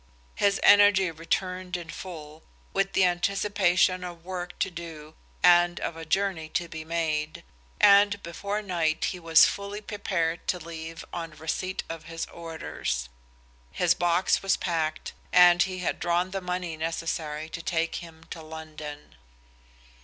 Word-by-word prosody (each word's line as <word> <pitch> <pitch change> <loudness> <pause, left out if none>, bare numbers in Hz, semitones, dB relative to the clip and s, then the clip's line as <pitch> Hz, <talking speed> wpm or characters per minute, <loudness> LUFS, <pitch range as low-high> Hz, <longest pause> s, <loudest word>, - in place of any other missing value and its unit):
His 200 -1 +2
energy 205 -3 +6
returned 180 +3 -2
in 170 -1 -8
full, 155 -4 -9 0.3
with 195 0 0
the 190 - +4
anticipation 185 0 +2
of 175 -2 -8
work 180 -1 -5
to 190 - -1
do 160 -3 -9 0.3
and 175 0 +5
of 165 - -3
a 165 0 -8
journey 175 -2 0
to 175 +2 -2
be 160 -1 -7
made, 155 -2 -2 0.4
and 200 0 +6
before 200 +5 -4
night 165 -5 0
he 180 - -7
was 165 -1 +6
fully 200 +1 -3
prepared 190 -6 -2
to 180 - +1
leave 165 -1 -8
on 165 -2 -5
receipt 160 +5 -3
of 165 -1 -7
his 165 0 -4
orders. 160 - -4 0.6
His 175 - +3
box 175 +1 +2
was 195 0 +2
packed, 160 -3 -2 0.2
and 175 -1 +7
he 185 0 0
had - - -1
drawn 175 +1 0
the 195 0 -3
money 180 -2 -3
necessary 160 -1 -3
to 165 - -6
take 165 -1 -1
him 165 -1 -11
to 165 - -6
London. 155 -2 -9
170 Hz, 145 wpm, -27 LUFS, 160-185 Hz, 0.6 s, and